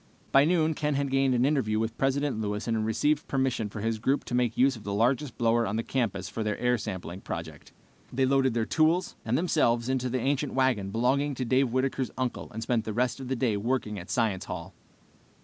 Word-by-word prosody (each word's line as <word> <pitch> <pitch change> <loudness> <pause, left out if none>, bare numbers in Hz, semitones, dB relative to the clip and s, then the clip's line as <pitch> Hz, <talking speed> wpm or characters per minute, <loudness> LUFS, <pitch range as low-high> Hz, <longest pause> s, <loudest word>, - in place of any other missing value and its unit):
By 135 +1 +6
noon 160 -1 +2
Ken 150 -1 -1
had 140 -1 -1
gained 135 -1 +3
an 120 +1 +3
interview 135 -7 +1
with 110 +1 -1
President 135 -3 0
Lewis 105 +1 -3
and 115 - +1
had 110 0 -1
received 145 +7 +1
permission 130 -5 0
for 100 - -7
his 115 0 -1
group 135 +5 +1
to - - -6
make 125 -2 +1
use 135 +1 +4
of 110 - -11
the 100 0 -3
largest 125 +4 +1
blower 115 0 +2
on 100 - -2
the 115 - -1
campus 105 -9 -2
for 115 - -5
their 105 -1 -1
air 125 0 +2
sampling 95 -3 -6
project. - - -7 0.4
They 130 +1 +1
loaded 135 -2 +2
their 115 -2 +1
tools 160 +7 +2
and 115 +3 0
themselves 125 -8 +1
into 130 -1 0
the 130 +1 -1
ancient 140 +2 -1
wagon 130 -7 +1
belonging 130 +6 +1
to 130 - -2
Dave 130 +2 +2
Whitaker's 130 0 0
uncle 130 -2 -3
and 110 +1 -5
spent 115 -1 0
the 110 - -4
rest 125 +4 0
of 130 - -6
the 130 - -1
day 120 -4 +1
working 105 -2 -1
at 90 - -10
Science 110 -6 0
Hall. 90 +1 -6
125 Hz, 225 wpm, -28 LUFS, 110-135 Hz, 0.4 s, By